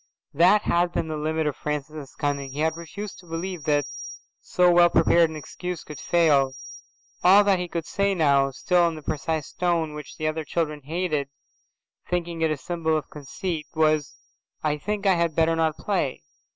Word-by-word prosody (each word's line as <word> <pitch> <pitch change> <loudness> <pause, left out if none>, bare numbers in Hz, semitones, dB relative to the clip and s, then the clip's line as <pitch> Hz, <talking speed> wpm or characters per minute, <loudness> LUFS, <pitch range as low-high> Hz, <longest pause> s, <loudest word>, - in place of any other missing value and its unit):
That 180 +7 +5
had 175 0 +1
been 160 - -2
the 155 - -2
limit 155 +1 -1
of 150 -3 -1
Francis's 150 -1 -5
cunning. 140 -2 -2
He 145 - -3
had 160 0 +1
refused 185 +5 -8
to 180 - -16
believe 165 -1 -5
that 145 -2 +2 0.5
so 180 0 +3
well 175 0 +6
prepared 170 -1 +4
an 160 - -8
excuse 180 +3 -6
could 150 -2 -9
fail. 145 -6 +3 0.7
All 195 +3 +7
that 200 -2 +3
he 180 - -3
could 170 -2 -4
say 200 +1 0
now, 140 -5 +3
still 175 +6 +2
in 165 - -3
the 155 - -10
precise 155 0 -3
tone 170 -3 0
which 150 -2 -9
other 155 0 -1
children 150 -1 -2
hated, 155 -3 -1 0.8
thinking 170 -2 -2
it 160 - +3
a 155 - -1
symbol 160 0 -1
of 150 - -6
conceit, 150 +2 -5
was, 155 -3 +2 0.5
"I 150 -1 0
think 210 +5 -3
I 195 - +5
had 170 -3 0
better 165 0 +3
not 160 -1 0
play." 180 - -2
160 Hz, 180 wpm, -25 LUFS, 150-175 Hz, 0.8 s, All